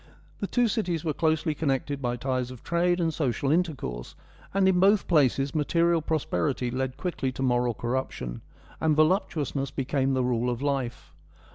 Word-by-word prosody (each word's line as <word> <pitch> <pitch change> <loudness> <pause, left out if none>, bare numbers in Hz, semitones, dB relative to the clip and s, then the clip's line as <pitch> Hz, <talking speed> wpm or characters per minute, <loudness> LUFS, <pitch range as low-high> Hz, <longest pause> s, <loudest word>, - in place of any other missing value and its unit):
The 200 - -2
two 245 +2 +2
cities 180 -8 -1
were 155 - 0
closely 160 0 +1
connected 140 -1 -1
by 120 -1 -1
ties 130 0 -2
of 125 -2 -11
trade 175 +1 +1
and 165 -2 +1
social 135 -2 0
intercourse, 150 - -2 0.4
and 195 -1 +3
in 185 -1 +4
both 200 +2 +4
places 140 -4 +2
material 165 +2 +2
prosperity 145 -5 -1
led 130 +1 -2
quickly 145 -5 -2
to 130 - -4
moral 120 -2 +1
corruption, 120 - -3 0.4
and 155 -1 +2
voluptuousness 155 -4 +1
became 135 0 0
the 130 - +1
rule 125 0 0
of 120 -1 -2
life. 125 - -3
140 Hz, 160 wpm, -27 LUFS, 125-165 Hz, 0.4 s, in